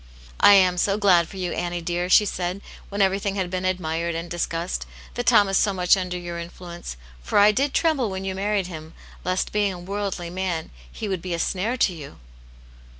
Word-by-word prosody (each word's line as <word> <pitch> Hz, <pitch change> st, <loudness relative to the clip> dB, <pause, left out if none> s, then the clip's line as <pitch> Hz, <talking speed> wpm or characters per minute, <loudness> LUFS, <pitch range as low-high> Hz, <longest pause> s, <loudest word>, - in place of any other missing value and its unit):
" -, -, -21 dB
I 205 Hz, -, +8 dB
am 180 Hz, -2 st, +4 dB
so 195 Hz, +2 st, +2 dB
glad 180 Hz, -5 st, +4 dB
for 195 Hz, -, -11 dB
you, 180 Hz, -2 st, -2 dB
Annie. 175 Hz, 0 st, -2 dB
dear," 175 Hz, +1 st, -2 dB
she 210 Hz, -, +6 dB
said, 180 Hz, 0 st, -3 dB, 0.3 s
when 200 Hz, 0 st, +1 dB
everything 195 Hz, +1 st, 0 dB
had 185 Hz, -3 st, -2 dB
been 185 Hz, 0 st, -2 dB
admired 170 Hz, -2 st, -1 dB
and 170 Hz, +1 st, -5 dB
discussed, 170 Hz, 0 st, -3 dB
" -, -, -18 dB
that 245 Hz, 0 st, -4 dB
Tom 210 Hz, -4 st, +6 dB
is 195 Hz, -, +1 dB
so 205 Hz, -, +2 dB
much 180 Hz, 0 st, +4 dB
under 180 Hz, -2 st, -3 dB
your 175 Hz, -1 st, -6 dB
influence. 170 Hz, -, -8 dB, 0.2 s
For -, -, -1 dB
I 205 Hz, +1 st, +7 dB
did 275 Hz, +7 st, 0 dB
tremble 290 Hz, -9 st, +1 dB
when 190 Hz, 0 st, -5 dB
you 190 Hz, -, -2 dB
married 200 Hz, 0 st, 0 dB
him, 160 Hz, -2 st, -9 dB, 0.3 s
lest 185 Hz, +1 st, -1 dB
being 205 Hz, -2 st, +1 dB
a 180 Hz, -, -8 dB
worldly 190 Hz, -2 st, -4 dB
man, 180 Hz, -3 st, -3 dB, 0.2 s
he 215 Hz, -, -5 dB
would 190 Hz, -4 st, -2 dB
be 180 Hz, -1 st, -3 dB
a -, -, -4 dB
snare 200 Hz, +8 st, -1 dB
to 195 Hz, -, +2 dB
you." 150 Hz, -4 st, -10 dB
185 Hz, 215 wpm, -24 LUFS, 175-200 Hz, 0.3 s, I